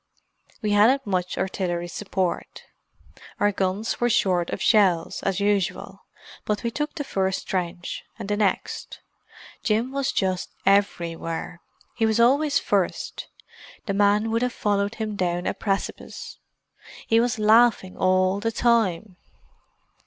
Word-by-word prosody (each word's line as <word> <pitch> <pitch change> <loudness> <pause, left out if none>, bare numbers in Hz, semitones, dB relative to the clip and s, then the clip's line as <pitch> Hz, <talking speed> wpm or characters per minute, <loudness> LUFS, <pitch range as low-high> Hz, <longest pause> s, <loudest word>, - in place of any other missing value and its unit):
"We 210 - 0
hadn't 240 +7 +4
much 180 -3 -2
artillery 175 -2 -2
support. 185 -1 -3 0.8
Our 205 - +3
guns 195 +4 -2
were 240 - +3
short 180 -6 +2
of - - -3
shells, 185 -7 +2
as 195 -1 -1
usual. 200 -2 -1 0.4
But 210 +2 -2
we 235 - -1
took 295 +5 -3
the 295 - -3
first 190 -7 -1
trench, 180 -1 -3
and - - -6
the 205 - 0
next. 205 -2 -2 0.6
Jim 225 +4 0
was 275 0 -1
just 185 -1 -1 0.2
everywhere. 170 -3 0 0.3
He 225 - +2
was 220 +1 +1
always 280 +5 +4
first; - - -1 0.6
the 200 - -1
men 205 +2 +2
would 230 +1 +1
have 250 0 0
followed 205 0 0
him 220 -2 -4
down 175 -2 -1
a - - 0
precipice. 195 -2 -4 0.7
He 225 - +3
was 240 +1 +1
laughing 215 -3 +4
all 185 +1 +2
the 225 +2 -1
time. 220 -5 +1
205 Hz, 135 wpm, -24 LUFS, 185-225 Hz, 0.8 s, hadn't